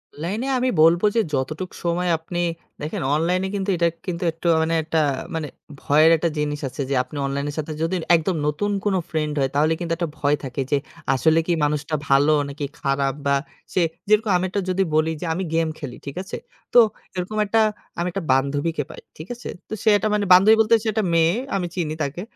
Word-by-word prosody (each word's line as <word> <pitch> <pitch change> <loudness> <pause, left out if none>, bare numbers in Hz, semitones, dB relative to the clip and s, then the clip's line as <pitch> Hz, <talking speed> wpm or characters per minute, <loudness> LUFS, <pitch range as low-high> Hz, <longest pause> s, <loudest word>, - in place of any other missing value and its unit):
অনলাইনে 200 - -3
আমি 255 +1 +1
বলবো 170 +5 +5
যে 225 - +4
যতটুকু 155 +7 -2
সময় 175 +1 0
আপনি 175 +2 -4 0.4
দেখেন 150 - -4
অনলাইনে 180 +4 +1
কিন্তু 195 0 -2
এটা 170 0 +3 0.2
কিন্তু 180 -1 -3
একটু 165 +2 -5 0.2
মানে 165 +1 0
একটা 160 0 0 0.3
মানে 155 -2 -2 0.3
ভয়ের 155 +3 +5
একটা 170 +1 0
জিনিস 150 0 -1
আছে। 140 - -6
যে 140 - +1
আপনি 135 +3 -10
অনলাইন 140 +1 -2
এর - - -10
সাথে 155 +1 -4
যদি 165 +3 0 0.2
একদম 165 +2 0
নতুন 185 +8 -1
কোন 200 -2 +2
ফ্রেন্ড 150 -2 -1
হয়, 135 -1 +1
তাহলে 155 +2 +3
কিন্তু 170 -1 -4
একটা 170 -3 -2
ভয় 145 +1 +2
থাকে, 135 +1 -3
যে 145 - +4 0.4
আসলে 160 +4 +3
কি 175 - +2
মানুষটা 150 +1 0
ভালো 145 +3 +5 0.2
নাকি 145 0 -4
খারা? 135 0 0 0.2
বা 140 0 +3 0.4
সে 185 - +2 0.3
যেরকম 215 0 +3
আমি 185 +1 -1 0.2
যদি 190 +1 +2
বলি 160 +1 +2
যে - - -3
আমি 190 +3 -2
গেম 165 0 +2
খেলি, 130 -5 -7
ঠিক 140 - -6
আছে? 190 - -6 0.4
তো 245 - +8 0.4
এরকম 185 +4 -3
একটা 225 +2 +2 0.4
আমি 175 - 0
একটা 195 -1 -4
বান্ধবীকে 145 +3 +1
পাই, - - -10 0.2
ঠিক 155 - -9
আছে? 240 - -8 0.2
তো - - -5
সে 220 - +4
একটা 205 +1 +2
মানে 205 -1 +1
বান্ধবী 205 +5 +7
বলতে 220 +1 +2
সে - - -3
একটা 220 0 0
মেয়ে, 165 +1 +4 0.2
আমি 180 -2 -1
চিনি 160 -4 -2
তাকে। 145 +5 -4
165 Hz, 205 wpm, -22 LUFS, 150-185 Hz, 0.4 s, তো